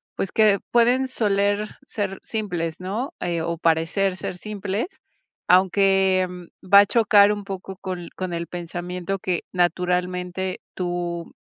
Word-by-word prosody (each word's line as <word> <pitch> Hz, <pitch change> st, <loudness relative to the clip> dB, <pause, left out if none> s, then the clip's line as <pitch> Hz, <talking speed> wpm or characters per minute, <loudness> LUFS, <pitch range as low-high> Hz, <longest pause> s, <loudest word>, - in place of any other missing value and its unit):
pues 195 Hz, -, -3 dB
que 210 Hz, -3 st, +4 dB
pueden 245 Hz, +3 st, +4 dB
soler 205 Hz, -3 st, +1 dB, 0.2 s
ser 200 Hz, -6 st, -3 dB
simples, 175 Hz, -7 st, -3 dB
¿no? 205 Hz, +9 st, -4 dB
Eh, 170 Hz, -1 st, -1 dB
o 170 Hz, +1 st, -2 dB
parecer 165 Hz, +4 st, +1 dB
ser -, -, -5 dB
simples, 205 Hz, -, -3 dB, 0.6 s
aunque 190 Hz, 0 st, +4 dB, 0.4 s
va 200 Hz, +2 st, +7 dB
a -, -, +3 dB
chocar 210 Hz, -2 st, +5 dB
un 205 Hz, -1 st, -6 dB
poco 195 Hz, -1 st, -7 dB
con 180 Hz, -2 st, -5 dB
con 185 Hz, -2 st, -4 dB
el 170 Hz, 0 st, -3 dB
pensamiento 175 Hz, +2 st, -4 dB
que 180 Hz, -2 st, -1 dB
naturalmente 180 Hz, +1 st, -1 dB
tú, 175 Hz, -2 st, -3 dB
190 Hz, 130 wpm, -23 LUFS, 175-205 Hz, 0.6 s, va